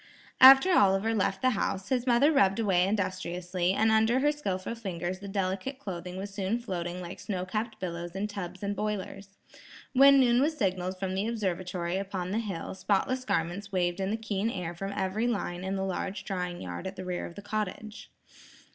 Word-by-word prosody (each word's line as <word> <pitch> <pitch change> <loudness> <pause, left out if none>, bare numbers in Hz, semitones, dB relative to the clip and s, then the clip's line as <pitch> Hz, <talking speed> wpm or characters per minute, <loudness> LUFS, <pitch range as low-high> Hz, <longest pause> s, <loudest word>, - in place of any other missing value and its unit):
After 270 +7 +9
Oliver 200 - +4
left 195 -1 0
the 255 - +4
house, 195 -3 -2
his 255 -1 0
mother 250 +5 +5
rubbed 195 -10 +3
away 190 -5 +2
industriously, 185 -2 -1
and 220 +2 +3
under 220 +3 +3
her 295 +2 +3
skilful 195 -9 -3
fingers 185 -5 -4
the 200 - -8
delicate 195 +6 -2
clothing 180 -7 -6
was 195 +1 -6
soon 195 +3 -1
floating 180 -6 -4
like 175 +1 -8
snow 185 -4 -3
capped 215 +3 -3
billows 170 -1 -5
in 195 +2 -1
tubs 190 -3 -6
and 200 0 -1
boilers. 200 -2 -4 0.6
When 275 +1 +7
noon 245 -1 +4
was 305 +2 +1
signalled 185 -3 -1
from 185 0 -3
the 195 +3 -1
observatory 185 -5 -2
upon 190 -2 -4
the 215 - 0
hill, 195 -7 -4
spotless 235 +7 0
garments 180 +2 -2
waved 175 -1 0
in 190 0 -1
the 220 - -1
keen 215 -1 -2
air 180 -6 -4
from 195 +3 -5
every 200 +4 -1
line 185 -6 -2
in 190 +1 -2
the 190 0 -1
large 190 +1 -3
drying 180 -2 -3
yard 90 - -5
at 190 - -6
the 185 -1 -7
rear 180 -1 -3
of 170 - -12
the 205 - -9
cottage. 215 0 -4
195 Hz, 190 wpm, -29 LUFS, 185-220 Hz, 0.6 s, After